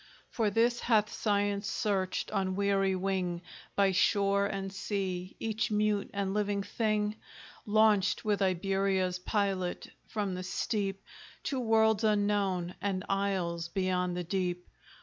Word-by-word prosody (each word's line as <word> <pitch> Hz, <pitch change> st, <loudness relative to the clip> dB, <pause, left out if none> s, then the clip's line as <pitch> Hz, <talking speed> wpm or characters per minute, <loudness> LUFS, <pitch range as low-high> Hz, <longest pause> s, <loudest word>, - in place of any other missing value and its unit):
For 220 Hz, -3 st, +1 dB
this 235 Hz, +3 st, +2 dB
hath 215 Hz, -3 st, +2 dB
Science 205 Hz, -1 st, 0 dB
searched, 195 Hz, -4 st, -1 dB
on 190 Hz, -2 st, 0 dB
weary 195 Hz, -1 st, +2 dB
wing, 185 Hz, -2 st, -1 dB, 0.3 s
By 200 Hz, -1 st, +4 dB
shore 200 Hz, +1 st, +3 dB
and 195 Hz, -1 st, -4 dB
sea, 185 Hz, -2 st, -3 dB
each 225 Hz, +1 st, -1 dB
mute 210 Hz, -1 st, +1 dB
and 200 Hz, -1 st, -2 dB
living 205 Hz, -1 st, 0 dB
thing? 215 Hz, 0 st, 0 dB, 0.5 s
Launched 210 Hz, -2 st, +3 dB
with 210 Hz, -1 st, +1 dB
Iberia's 190 Hz, 0 st, +1 dB
pilot 190 Hz, -2 st, -1 dB, 0.2 s
from 205 Hz, -3 st, -2 dB
the 180 Hz, -, -4 dB
steep, 195 Hz, +1 st, -2 dB, 0.4 s
To 270 Hz, -, -1 dB
worlds 220 Hz, -2 st, +3 dB
unknown, 205 Hz, -4 st, +1 dB
and 190 Hz, -2 st, -1 dB
isles 190 Hz, -4 st, 0 dB
beyond 180 Hz, -1 st, -1 dB
the 180 Hz, -, -2 dB
deep? 180 Hz, 0 st, -2 dB
200 Hz, 130 wpm, -31 LUFS, 185-210 Hz, 0.5 s, By